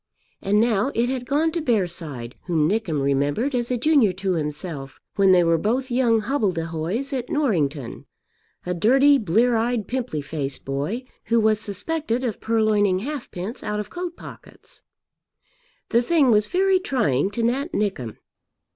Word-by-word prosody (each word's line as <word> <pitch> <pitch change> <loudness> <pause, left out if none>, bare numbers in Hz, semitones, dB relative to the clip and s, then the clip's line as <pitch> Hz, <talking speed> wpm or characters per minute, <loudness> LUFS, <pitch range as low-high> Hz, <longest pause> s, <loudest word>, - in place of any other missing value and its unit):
And 205 +2 +2
now 225 +2 +2
it 235 +2 +1
had 255 -2 -3
gone 310 +3 +1
to 335 0 -2
Bearside 170 - -2
whom 160 -4 +2
Nickem 190 -6 -1
remembered 145 - 0
as 240 -1 -1
a 250 - 0
junior 265 -5 +4
to 190 0 -2
himself 150 -3 -4 0.2
when 195 -1 +4
they 180 -1 +5
were 165 -1 +2
both 250 - -1
young 240 -3 +3
hobbledehoys 195 - -2
at 250 -2 -3
Norrington, 155 - -1 0.6
a 180 - -1
dirty, 270 - +4
blear 225 +5 +2
eyed, 225 -2 0
pimply 240 - -3
faced 145 -2 -5
boy 145 - -3 0.2
who 230 0 +2
was 215 -1 +3
suspected 240 - -2
of 230 -5 -3
purloining 215 -4 +2
halfpence 230 -4 -5
out 210 0 -3
of 210 -1 -6
coat 350 0 -5
pockets. - - -13 1.1
The 235 - +3
thing 280 -1 +3
was 210 -1 +3
very 380 - +2
trying 195 - 0
to 230 +3 -3
Nat 270 +8 0
Nickem. 195 - -2
215 Hz, 155 wpm, -23 LUFS, 170-255 Hz, 1.1 s, they